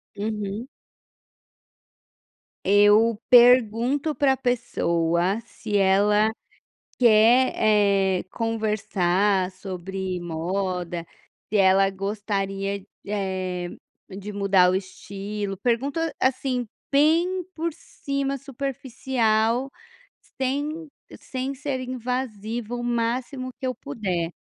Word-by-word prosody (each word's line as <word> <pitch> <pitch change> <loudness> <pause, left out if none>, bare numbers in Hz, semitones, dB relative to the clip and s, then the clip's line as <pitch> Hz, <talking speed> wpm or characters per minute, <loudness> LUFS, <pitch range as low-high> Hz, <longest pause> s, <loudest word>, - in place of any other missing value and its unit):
Uhum. 210 +2 -4 2.0
Eu 205 +2 +5
pergunto 245 +4 +5
para 275 -2 +3
a - - -4
pessoa 180 -7 0
se 215 -2 -4
ela 205 +3 +3 0.7
quer, 235 +2 +5
eh, 200 -3 +2
conversar 205 -4 0
sobre 190 0 -5
moda, 175 0 -3 0.4
se 215 - +1
ela 195 0 +5
gostaria, 195 0 -3 0.2
eh, 185 -3 -3 0.4
de 200 +2 -7
mudar 195 -2 +4
o - - 0
estilo. 195 +1 -5
Pergunto, 255 +8 0 0.2
assim, 255 -2 0 0.2
bem 335 +6 +3
por 330 -1 -3
cima, 275 -4 -4
superficial, 260 -3 -1 0.7
sem 295 +4 -2 0.3
sem 265 +1 -4
ser 270 -1 -3
invasiva 240 -2 -4
o 240 - -4
máximo 240 +2 -2
que 260 - -3
eu 255 - -1
puder, 190 -11 -3
215 Hz, 90 wpm, -24 LUFS, 195-255 Hz, 2.0 s, Eu